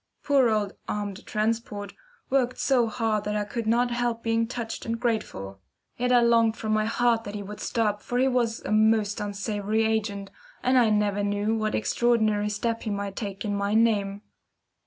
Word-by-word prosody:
Poor 275 -4 +4
old 210 -2 0
"armed 205 0 -4
transport" 215 -2 -2 0.4
worked 255 -2 +1
so 250 -4 +2
hard 220 -2 -1
that 210 0 -2
I 210 - 0
could 220 +2 -4
not 240 +2 +2
help 240 -1 -1
being 230 0 +1
touched 230 -2 -5
and 230 0 -3
grateful; 100 - -3 0.4
yet 250 +1 0
I 245 -1 +6
longed 230 -1 +3
from 215 -2 -3
my 215 0 +2
heart 230 0 +2
that 205 0 -7
he 205 - -4
would 210 +1 -8
stop 210 -3 -1
for 245 - -3
he 260 +1 +3
was 240 -3 0
a - - -5
most 215 -1 +3
unsavoury 205 +1 -1
agent, 210 -3 -1 0.3
and 255 0 +4
I 235 -3 +4
never 205 -1 +1
knew 205 +2 0
what 215 -1 -1
extraordinary 215 -3 +1
step 230 +2 -2
he 220 - -4
might 200 -1 -3
take 200 -2 -5
in 205 -1 -1
my 200 +1 0
name. 205 -3 +2
220 Hz, 185 wpm, -26 LUFS, 205-230 Hz, 0.4 s, I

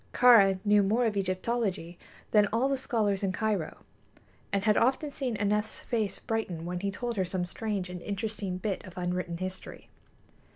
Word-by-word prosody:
Kāra 220 -6 +7
knew 205 0 +5
more 220 +5 +2
of 220 -2 0
Egyptology 185 -2 -2 0.3
than 210 -1 +5
all 230 +6 +1
the 275 - +1
scholars 220 -7 0
in 195 -2 0
Cairo, 200 -4 -2 0.7
and 200 -1 0
had 210 0 +4
often 270 +5 +2
seen 255 -6 -3
Aneth's 210 +1 -1
face 220 -5 -1
brighten 190 -7 -3
when 180 0 -3
he 200 +2 -1
told 235 +3 -4
her 190 - +2
some 180 0 -2
strange 200 0 -3
and 180 -1 -7
interesting 200 -2 -3
bit 195 +1 -3
of 185 -2 -12
unwritten 180 -1 -2
history. 185 +1 -7
205 Hz, 170 wpm, -29 LUFS, 185-225 Hz, 0.7 s, Kāra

